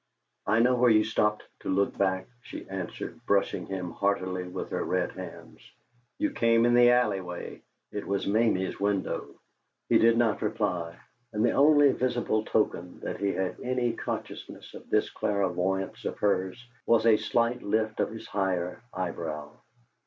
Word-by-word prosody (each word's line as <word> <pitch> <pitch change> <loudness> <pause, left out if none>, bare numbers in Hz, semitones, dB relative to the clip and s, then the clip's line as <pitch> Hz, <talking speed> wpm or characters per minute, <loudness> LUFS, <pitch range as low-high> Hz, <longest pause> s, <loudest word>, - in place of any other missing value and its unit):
"I 110 +2 +4
know 125 +2 +4
where 125 0 +4
you 110 -1 +5
stopped 105 -1 0 0.2
to - - -6
look 100 +1 +1
back," 95 -1 0
she - - -9
answered, 95 -2 -6
brushing 100 -1 +1
him 90 -2 -4
heartily 95 -2 -1
with 90 - -6
her - - -1
red - - 0
hands. - - -10 0.6
"You 310 0 0
came 115 - +3
in 120 - +4
the 120 0 +7
alley 120 -6 +3
way. 90 -1 -7 0.3
It 105 - -5
was 100 -1 -1
Mamie's 105 -3 +1
window." 100 -1 -1 0.6
He - - +5
did 115 0 +5
not 115 -3 +2
reply, 85 -2 -1 0.4
and 105 +1 +2
the - - +3
only 145 -1 +6
visible 120 -4 0
token 90 -5 -1
that - - -4
he 100 0 +1
had 95 -1 -2
any 125 -2 0
consciousness - - -6
of - - -12
this - - +1
clairvoyance 95 -1 -1
of - - -3
hers 100 +3 0 0.2
was 115 -1 +4
a 110 -2 +6
slight 115 +3 0
lift 110 +1 -1
of - - +1
his 110 0 -9
higher 90 -1 -2
eyebrow. 80 -5 -4
105 Hz, 160 wpm, -28 LUFS, 95-115 Hz, 0.6 s, the